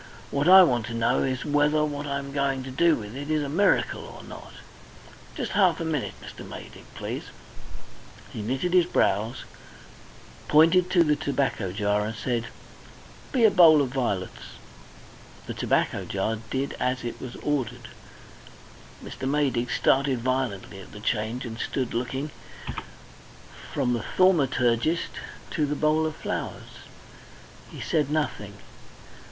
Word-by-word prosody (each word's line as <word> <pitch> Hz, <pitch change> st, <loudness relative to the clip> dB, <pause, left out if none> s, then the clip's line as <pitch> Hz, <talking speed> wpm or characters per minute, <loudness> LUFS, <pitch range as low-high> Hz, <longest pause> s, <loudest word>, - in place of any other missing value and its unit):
What 140 Hz, +3 st, 0 dB
I 190 Hz, 0 st, +10 dB
want 120 Hz, -8 st, +1 dB
to 115 Hz, -, -5 dB
know 115 Hz, 0 st, +2 dB
is 130 Hz, -2 st, -1 dB
whether 150 Hz, +1 st, +3 dB
what 145 Hz, -1 st, -4 dB
I 140 Hz, 0 st, -1 dB
am 140 Hz, 0 st, -6 dB
going 135 Hz, -1 st, 0 dB
to 130 Hz, -, -7 dB
do 165 Hz, +5 st, +4 dB
with 105 Hz, +1 st, -8 dB
it 145 Hz, +2 st, -6 dB
is 155 Hz, -1 st, +1 dB
a -, -, -3 dB
miracle 195 Hz, +8 st, +2 dB
or -, -, -11 dB
not. -, -, -11 dB, 0.8 s
Just -, -, -3 dB
half 185 Hz, -5 st, +3 dB
a 165 Hz, -, -2 dB
minute, 155 Hz, -4 st, -2 dB
Mr. -, -, -9 dB
Maydig, -, -, -10 dB
please." -, -, -5 dB, 1.1 s
He 110 Hz, -, -5 dB
knitted 130 Hz, +11 st, -1 dB
his 180 Hz, -2 st, +5 dB
brows, 110 Hz, -, +1 dB, 1.0 s
pointed 165 Hz, +4 st, +5 dB
to 175 Hz, -2 st, +5 dB
the 150 Hz, -2 st, +2 dB
tobacco 140 Hz, -9 st, -1 dB
jar 105 Hz, +1 st, 0 dB
and 110 Hz, +2 st, -4 dB
said: 120 Hz, 0 st, -2 dB, 0.8 s
"Be 250 Hz, -5 st, +4 dB
a 215 Hz, -, +6 dB
bowl 165 Hz, -5 st, +7 dB
of 140 Hz, -3 st, +1 dB
vi'lets." 100 Hz, -8 st, -3 dB, 0.9 s
The -, -, -5 dB
tobacco -, -, 0 dB
jar 110 Hz, 0 st, -1 dB
did 135 Hz, +1 st, -2 dB
as 125 Hz, 0 st, -1 dB
it 120 Hz, -, -5 dB
was 125 Hz, -2 st, -7 dB
ordered. 145 Hz, -6 st, -2 dB, 1.2 s
Mr. 130 Hz, -, -5 dB
Maydig 135 Hz, -4 st, +1 dB
started 135 Hz, -2 st, +2 dB
violently 125 Hz, -6 st, -2 dB
at 95 Hz, -, -12 dB
the 105 Hz, -, -9 dB
change, 110 Hz, +4 st, -2 dB
and 115 Hz, -1 st, -7 dB
stood 130 Hz, -3 st, -2 dB
looking 130 Hz, +5 st, -3 dB, 1.4 s
from 125 Hz, -, 0 dB
the 115 Hz, -3 st, -2 dB
thaumaturgist 145 Hz, -4 st, +3 dB, 0.4 s
to 150 Hz, -3 st, 0 dB
the 150 Hz, -, -1 dB
bowl 155 Hz, +2 st, +2 dB
of 155 Hz, -, -5 dB
flowers. -, -, -5 dB, 0.9 s
He -, -, -9 dB
said 150 Hz, -3 st, 0 dB
nothing. 145 Hz, -9 st, -2 dB
135 Hz, 145 wpm, -26 LUFS, 120-155 Hz, 1.4 s, I